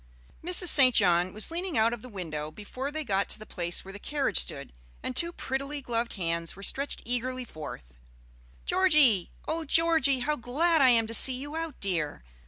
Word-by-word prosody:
Mrs. 360 +1 +7
St. 255 -5 +6
John 180 -2 +3
was 215 - 0
leaning 345 -3 -3
out 225 +2 +2
of 240 - -7
the 255 - -11
window 155 -7 -6
before 235 - -7
they 310 +1 -4
got 200 -6 -2
to - - -3
the 215 - -12
place 175 -3 -4
where 195 - -10
the 205 - -9
carriage 285 +4 -1
stood, 140 -1 -4 0.3
and 255 - -5
two 340 +5 +1
prettily 275 -1 -5
gloved 235 -3 -4
hands 170 -3 -3
were 195 - -11
stretched 275 +7 -1
eagerly 250 +1 -3
forth. 65 - -11 0.7
"Georgie! 305 - +4 0.2
oh 325 +1 -3
Georgie, 315 -4 +2
how 300 +4 -1
glad 300 +6 0
I 260 - +5
am 230 -2 +3
to 225 - -7
see 260 +3 +5
you 290 +4 -8
out, 325 -1 -6
dear! 160 - -3
245 Hz, 190 wpm, -27 LUFS, 195-295 Hz, 0.7 s, Mrs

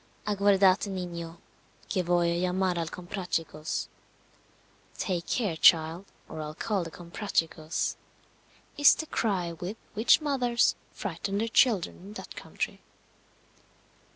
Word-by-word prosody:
Aguardate 200 -1 +4
niño, 170 -3 -5 0.5
que 190 - 0
voy 175 -1 +2
a - - 0
llamar 180 0 0
al 165 -1 -2
Comprachicos 175 -4 -3 1.1
Take 175 -3 -2
care, 205 -9 0
child, 165 +1 +4 0.2
or 155 - -6
I'll 155 0 -6
call 200 +1 -1
the 165 - -6
Comprachicos 170 -2 -2 0.8
is 290 - +8
the 315 - -4
cry 190 - -1
with 180 +6 -6 0.2
which 220 +3 +5
mothers 255 -5 +2 0.2
frighten 200 -1 -4
their 225 +2 0
children 225 -5 +3
in 195 +4 -11
that - - -9
country. - - -5
185 Hz, 120 wpm, -28 LUFS, 170-205 Hz, 1.1 s, is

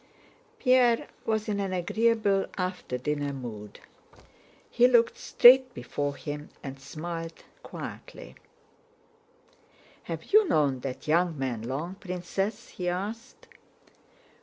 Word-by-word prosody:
Pierre 250 -3 +3 0.2
was 220 -1 0
in 205 -2 -1
an 195 -2 -2
agreeable 205 +2 +1
after 180 -8 -3
dinner 145 +2 -2
mood. 110 -6 -8 0.9
He 245 0 +4
looked 235 -2 +4
straight 255 0 +6
before 145 -1 -3
him 145 0 -6
and 135 -1 -7
smiled 165 +4 -7 0.2
quietly. - - -9 1.7
"Have - - -5
you 430 -1 +7
known 140 -4 +2
that 130 +2 -6
young 170 +1 +2
man 130 -4 -2
long, 140 +10 -4
Princess?" 185 +2 -4
he 180 -1 -3
asked. 205 +6 -5
180 Hz, 110 wpm, -28 LUFS, 145-220 Hz, 1.7 s, you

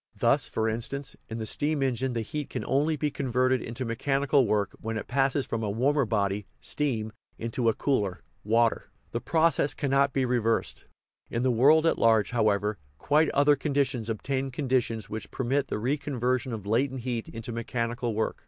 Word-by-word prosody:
Thus, - - +3
for 110 0 -1
instance, 120 +5 -1
in 110 - -4
the 110 - -4
steam 145 +5 0
engine 130 0 0
the 115 - -1
heat 150 +5 -5
can - - -4
only 150 +4 +1
be 150 0 -1
converted 130 -2 +1
into 120 +3 -4
mechanical 135 +2 +1
work 100 -1 +1
when 110 0 -3
it - - -5
passes 135 +1 +1
from 115 - -3
a 105 - -1
warmer 135 +6 +2
body 100 -2 -1
(steam) 115 -7 -2 0.2
into 115 +1 0
a 110 - 0
cooler 105 -10 -1 0.2
(water); 115 +2 +2 0.2
the 120 - -3
proc 165 0 +2
ess 145 - +1
cannot 140 -1 +2
be 130 0 +1
reversed. 115 -2 0 0.4
In 115 - -1
the 130 - +3
world 145 +7 +5
at 165 - +2
large, 110 -2 +3
however, 105 -4 +1 0.2
quite 150 - +2
other 145 +1 +4
conditions 135 -5 -1
obtain 130 +4 -2
conditions 125 -6 -1
which 110 +1 -6
per 130 - -4
mit 135 +3 +1
the - - -2
reconversion 130 0 -1
of 110 -4 -5
latent 130 +5 0
heat 120 -2 -3
into 115 +1 -6
mechanical 115 0 -2
work. 110 - -1
125 Hz, 180 wpm, -27 LUFS, 115-140 Hz, 0.4 s, world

